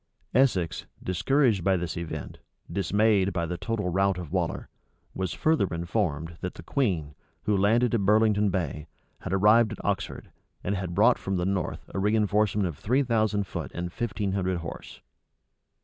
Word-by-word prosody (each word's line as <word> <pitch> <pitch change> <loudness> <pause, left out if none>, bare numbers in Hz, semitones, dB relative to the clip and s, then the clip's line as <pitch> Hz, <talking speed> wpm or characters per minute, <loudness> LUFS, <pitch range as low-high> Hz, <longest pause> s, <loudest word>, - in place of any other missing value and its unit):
Essex, 100 -11 +2 0.2
discouraged 110 - +2
by 95 0 +3
this 90 0 -3
event, 85 -2 -6 0.3
dismayed 100 +1 +2
by 85 -1 -1
the 90 +2 -3
total 105 0 -2
rout 95 +1 +2
of 85 -4 -7
Waller, 90 -3 -1 0.5
was 95 -3 -2
further 155 -10 +2
informed, 85 -1 -2
that 90 - -4
the - - -10
queen, 85 - -1 0.3
who 105 - +1
landed 115 +5 +3
at 115 - +2
Burlington 105 0 +4
Bay, 80 -4 -3 0.3
had - - -6
arrived 105 +3 +5
at - - -9
Oxford, 100 -1 -3 0.3
and 100 - -1
had 90 -3 -3
brought 115 +5 +5
from 95 -1 -2
the 90 - 0
north 95 -1 -2
a - - -4
reënforcement 105 0 +2
of 85 -6 -4
three 130 +6 +2
thousand 110 -4 +1
foot - - -5
and 90 0 -4
fifteen 105 -4 -2
hundred 95 -2 0
horse. 85 -1 -8
95 Hz, 165 wpm, -27 LUFS, 90-110 Hz, 0.5 s, arrived